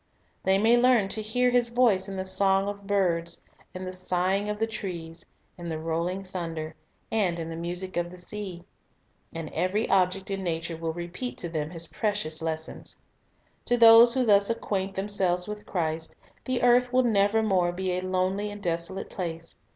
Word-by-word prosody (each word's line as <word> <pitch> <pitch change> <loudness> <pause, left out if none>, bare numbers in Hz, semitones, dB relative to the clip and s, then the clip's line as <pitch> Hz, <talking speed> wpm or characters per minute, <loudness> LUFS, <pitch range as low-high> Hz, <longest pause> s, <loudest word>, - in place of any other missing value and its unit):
They 190 0 +3
may 225 +4 +4
learn 240 -5 +4
to 215 - -2
hear 245 +4 +1
His 245 -1 +2
voice 230 -6 +2
in 195 - -5
the 190 - -3
song 195 +1 +2
of 200 -1 -6
birds, 175 -4 0 0.3
in 185 +1 -7
the 185 - -5
sighing 185 +2 0
of 210 - -2
the 225 - +1
trees, 170 -6 -6 0.4
in 170 -1 -6
the 160 - -3
rolling 170 +4 -2
thunder, 165 -4 -5 0.4
and 195 -6 +1
in 165 0 -5
the - - -5
music 175 +3 -4
of 175 0 -1
the 180 - -11
sea. 180 -1 -6 0.7
And 165 -2 -6
every 200 +5 0
object 190 +1 +2
in 195 0 -2
nature 165 -1 -2
will 165 0 -3
repeat 175 +9 -5
to 170 - -4
them 155 -2 -3
His 165 -1 +1
precious 200 -8 -2
lessons. 160 -1 -4 0.7
To 245 - +2
those 230 +1 +8
who 260 -1 +2
thus 200 -2 +4
acquaint 195 -4 -2
themselves 190 -2 +2
with 210 0 -7
Christ, 160 -3 -2 0.3
the 255 -2 -1
earth 245 0 +4
will 255 0 +3
nevermore 200 -4 +2
be 185 +1 -2
a 180 0 -1
lonely 185 +2 -1
and 205 0 -8
desolate 170 +2 -2
place. 165 -2 -5
190 Hz, 180 wpm, -27 LUFS, 170-210 Hz, 0.7 s, those